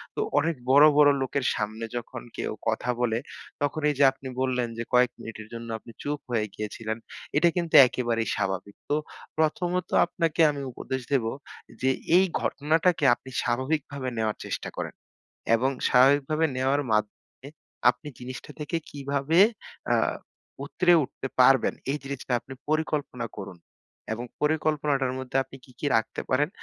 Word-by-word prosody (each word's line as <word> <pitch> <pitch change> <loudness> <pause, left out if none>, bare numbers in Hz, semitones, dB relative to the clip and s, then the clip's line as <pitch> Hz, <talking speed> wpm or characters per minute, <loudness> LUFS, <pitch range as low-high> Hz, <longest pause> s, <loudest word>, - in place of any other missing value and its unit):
তো - - -4 0.2
অনেক 165 0 0
বড়, 140 +3 +8
বড় 150 -1 +7
লোকের 130 0 -1
সামনে 110 +2 -3
যখন 120 - -6 0.2
কেউ - - -2 0.2
কথা 115 +2 -1
বলে, 115 -2 +1 0.4
তখন 145 +2 -1
এই 145 - 0
যে - - +6
আপনি 135 0 -11
বললেন 125 -2 0
যে 115 - -2
কয়েক 125 -1 +5
মিনিটের 110 -1 -8
জন্য 115 0 -7
আপনি 115 - -13
চুপ 145 0 -2
হয়ে 110 -3 +1
গিয়েছিলেন। 110 +1 -4 0.4
এটা 170 +3 +5
কিন্তু 170 -2 0
একেবারেই 120 -2 -1
স্বাভাবিক। 95 +1 -3
তো 145 - +2 0.4
প্রথমত 175 +3 0 0.2
আপনাকে 165 -2 0
আমি 140 -1 -5
উপদেশ 130 +2 -4
দেব 130 -5 +2 0.6
যে 130 - +3 0.3
এই 190 - +5 0.2
ঘটনাটাকে 160 +3 +1
আপনি 130 - -8
স্বাভাবিকভাবে 130 +2 -1
নেওয়ার 110 -1 0
চেষ্টা - - -4
করেন। - - -4 0.6
এবং 130 +4 +2 0.2
স্বাভাবিকভাবে 145 +5 +4
নেওয়ার 135 +3 +1
মাধ্যমে 105 +5 -3 0.4
আপনি 150 - -10
জিনিসটা 130 +1 -8
থেকে 150 +3 -2
কিভাবে 140 +3 0 0.5
আ - - +5 0.7
উতরে 175 -1 +3
উঠতে 135 0 -6
পারবেন 130 0 +5 0.2
এই 140 - 0
জিরিসটা 135 -2 -5
আপনি 135 - -10
পরিকল্পনা 150 -5 -1
করুন। 100 -3 -7 0.6
এবং 115 +2 -4 0.2
পরিকল্পনাটার 150 -3 +1
মধ্যে 130 0 -2
আপনি 135 - -13
কি, - - -18
কি - - -2
রাখতে 115 - -1
পারেন 145 +4 +3
135 Hz, 150 wpm, -26 LUFS, 120-150 Hz, 0.7 s, বড়